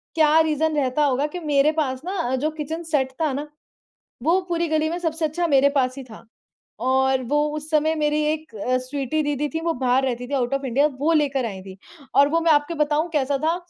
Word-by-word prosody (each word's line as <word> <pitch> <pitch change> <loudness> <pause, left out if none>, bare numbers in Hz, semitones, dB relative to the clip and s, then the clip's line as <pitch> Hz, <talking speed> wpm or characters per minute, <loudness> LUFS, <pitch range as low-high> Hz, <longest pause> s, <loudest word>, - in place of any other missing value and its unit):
क्या 315 0 +5
रीजन 315 0 +1
रहता 275 +1 +1
होगा 275 0 +1
कि 360 - -3
मेरे 295 -1 +2
पास 260 -3 -3
ना 380 +2 -3
अ, 260 -7 -1
जो 290 +4 -1
किचन 315 +2 -5
सेट 265 -4 +1
था 310 - +1
ना, 290 +3 -4 0.8
वो 340 +6 +3
पूरी 340 0 0
गली 315 0 +1
में 340 - -3
सबसे 325 -2 -1
अच्छा 340 +3 -1
मेरे 280 -2 +4
पास 255 -1 +1
ही 270 - -6
था 230 -3 -14 0.6
और 265 0 +2
वो 295 +4 +1 0.2
उस 305 0 -6
समय 315 +1 +2
मेरी 300 0 +1
एक 310 -6 -9
अ, 250 +5 0
स्वीटी 275 +3 -2
दीदी 290 0 -1
थी, 320 +2 -4
वो 330 0 0
बाहर 255 +1 +1
रहती 245 -1 -3
थी, 285 - -7
आउट 255 -1 0
ऑफ़ 275 0 -1
इंडिया, 270 +4 +2
वो 315 +4 +2
ले 300 -2 +3
कर 270 -3 -1
आईं 195 -4 -6
थी 190 -1 -11 0.4
और 280 +1 +6
वो 330 +2 +2
मैं 330 -1 +3
आपको 295 +2 +2
बताऊँ 300 +3 -1
कैसा 280 -1 +1
था, 320 +4 0
295 Hz, 230 wpm, -23 LUFS, 265-315 Hz, 0.8 s, और